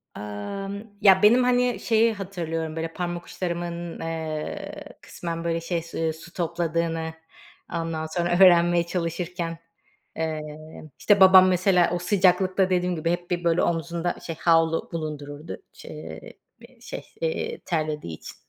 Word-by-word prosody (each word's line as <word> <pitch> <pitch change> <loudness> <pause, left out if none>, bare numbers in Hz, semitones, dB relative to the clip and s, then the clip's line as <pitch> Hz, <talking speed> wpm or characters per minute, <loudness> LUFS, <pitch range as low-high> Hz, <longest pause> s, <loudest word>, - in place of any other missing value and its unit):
Amm, 195 - -6
ya 190 -2 +6
benim, 240 +4 +6
hani, 250 0 +2
şeyi 225 0 +3
hatırlıyorum, 165 -5 -4
böyle 165 0 -4
parmak 175 -1 -4
uçlarımın, 170 -1 -4
eee, 160 -2 -5
kısmen 165 -1 -5
böyle 165 0 -1
şey, 170 0 -2
su 165 -1 -2
su 165 +2 -13
topladığını, 165 -1 -1 0.6
ondan 165 -1 -2
sonra 175 +2 0
öğrenmeye 175 -2 +6
çalışırken, 170 0 -3 0.6
eee, 160 -1 -2 0.6
işte 205 -1 +4
babam 185 0 +9
mesela 180 -1 +3
o 175 - 0
sıcaklıkta 185 0 +3
dediğim 180 -1 +1
gibi 165 +1 -1
hep 175 0 -3
bir 175 0 -1
böyle 170 0 +2
omzunda 170 +1 -1
şey 165 - -4
havlu 165 0 +2
bulundururdu 150 -1 -5 0.2
şey, - - -9 0.4
bi - - -18
şey, - - -7 0.2
eee, 475 -1 -2
terlediği 155 - -2
için. - - -11
170 Hz, 135 wpm, -25 LUFS, 165-185 Hz, 0.6 s, babam